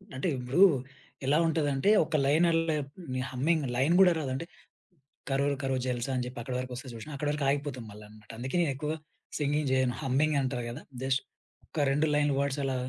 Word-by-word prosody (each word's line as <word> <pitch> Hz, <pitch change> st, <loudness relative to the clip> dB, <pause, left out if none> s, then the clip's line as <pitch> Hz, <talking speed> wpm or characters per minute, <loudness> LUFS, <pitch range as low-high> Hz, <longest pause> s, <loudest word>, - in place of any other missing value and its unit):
అంటే 135 Hz, +8 st, -1 dB
ఇప్పుడు. 125 Hz, +8 st, 0 dB, 0.6 s
ఎలా 140 Hz, +3 st, +3 dB
ఉంటదంటే, 150 Hz, 0 st, +1 dB, 0.2 s
ఒక 160 Hz, +1 st, -3 dB
లైన్ 155 Hz, +5 st, +4 dB
అల్లే 165 Hz, -1 st, +2 dB, 0.4 s
మీ 130 Hz, -, -1 dB
హమ్మింగ్ 150 Hz, +5 st, +1 dB
లైన్ 135 Hz, +7 st, +3 dB
గూడా 185 Hz, -2 st, +7 dB
రాదు 145 Hz, -5 st, -3 dB
అంటే, 135 Hz, +6 st, -3 dB, 0.8 s
కరో 135 Hz, +1 st, +1 dB, 0.2 s
కరో 135 Hz, -1 st, 0 dB
జల్సా 125 Hz, +1 st, -2 dB
అని 125 Hz, -, 0 dB
జెప్పి 125 Hz, 0 st, -7 dB
అక్కడి 125 Hz, +1 st, -4 dB
వరకొస్తే 130 Hz, +1 st, -6 dB
చూశినవ 115 Hz, +6 st, -8 dB
అక్కడి 145 Hz, +1 st, -2 dB
వరకు 150 Hz, -1 st, -2 dB
ఆగిపోతుంది 140 Hz, -4 st, -2 dB
మళ్ళ 105 Hz, +1 st, -11 dB
అన్నమాట. 105 Hz, 0 st, -17 dB
అందుకే 130 Hz, +5 st, -4 dB
నేనెక్కువ 150 Hz, -1 st, -1 dB, 0.5 s
సింగింగ్ 145 Hz, -1 st, 0 dB
జేయను. 130 Hz, -2 st, +2 dB
హమ్మింగ్ 145 Hz, +2 st, +1 dB
అంటారు 130 Hz, -2 st, -2 dB
గదా! 120 Hz, +5 st, -7 dB, 0.2 s
జస్ట్ 135 Hz, 0 st, +1 dB, 0.5 s
ఒక 145 Hz, -3 st, 0 dB
2 150 Hz, +3 st, +2 dB
లైన్ 145 Hz, 0 st, +3 dB
వర్డ్స్ 140 Hz, 0 st, 0 dB
అలా 135 Hz, -1 st, -1 dB
135 Hz, 180 wpm, -29 LUFS, 130-150 Hz, 0.8 s, గూడా